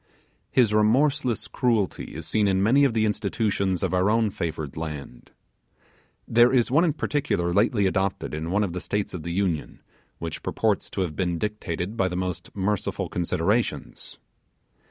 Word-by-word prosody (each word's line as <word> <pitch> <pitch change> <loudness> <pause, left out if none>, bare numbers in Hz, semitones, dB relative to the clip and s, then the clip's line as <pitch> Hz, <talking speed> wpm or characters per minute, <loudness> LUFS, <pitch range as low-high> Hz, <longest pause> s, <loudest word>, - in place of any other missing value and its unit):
His 120 -5 +3
remorseless 120 +2 +2
cruelty 115 - -1
is 80 0 -6
seen 105 +4 +1
in 95 0 +2
many 135 +7 +5
of 125 -4 +1
the 110 -1 +3
institutions 100 -3 0
of - - 0
our 90 +2 +3
own 110 -1 +2
favoured 80 -5 -4
land. 75 -6 -7 1.0
There 120 +2 +5
is 125 -2 +2
one 150 +6 +5
in 165 -4 +2
particular 90 -15 -1
lately 105 +1 +3
adopted 95 -2 -1
in 80 +2 -3
one 105 +4 +2
of 95 -4 -2
the 90 - -4
States 105 0 -2
of 90 - -5
the 85 - -6
Union, 90 -4 -2 0.3
which 80 -2 -5
purports 110 -3 0
to 95 - -3
have 85 -5 -2
been 90 -3 -1
dictated 105 0 -3
by 95 - +2
the 90 -1 -3
most 90 -1 -3
merciful 100 0 -1
considerations. 90 - -1
100 Hz, 165 wpm, -25 LUFS, 85-110 Hz, 1.0 s, many